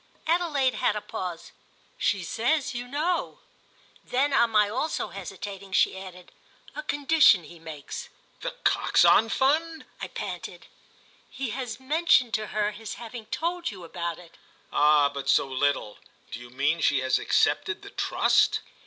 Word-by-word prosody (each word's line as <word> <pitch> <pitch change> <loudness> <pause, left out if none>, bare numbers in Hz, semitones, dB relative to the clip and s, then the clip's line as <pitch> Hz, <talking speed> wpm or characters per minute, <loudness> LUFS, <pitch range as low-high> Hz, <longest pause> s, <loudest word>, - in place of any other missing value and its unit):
Adelaide 310 -6 +1
had 210 - +1
a - - -1
pause. 180 -4 -6 0.5
"She 195 -3 +1
says 250 - 0
you 245 0 -5
know." 315 +7 -1 0.7
Then 275 +3 0
on 235 -3 +4
my 210 -2 +4
also 260 +9 -2
hesitating 195 +1 -8
she - - +3
added: 185 -2 -10 0.4
"A 300 - -4
condition 290 - +4
he 170 +1 -13
makes." 155 -3 -8 0.3
"The - - -5
Coxon 225 - +4
Fund?" 315 +6 +1 0.2
I - - -3
panted. - - -7 0.6
"He 265 -3 -4
has 250 0 -5
mentioned 265 -3 +3
to 215 -1 -1
her 210 0 -1
his 215 +1 -7
having 230 -1 -9
told 345 +7 -2
you 190 -5 -10
about 170 0 -4
it." 175 -2 -16 0.4
"Ah 150 -1 +5
but 140 -1 -5
so - - +4
little! 130 -5 -1 0.3
Do - - -6
you 120 0 -11
mean 140 +6 0
she 135 -3 +3
has 130 0 +1
accepted - - +1
the - - -10
trust?" - - +2
215 Hz, 150 wpm, -26 LUFS, 170-275 Hz, 0.7 s, Ah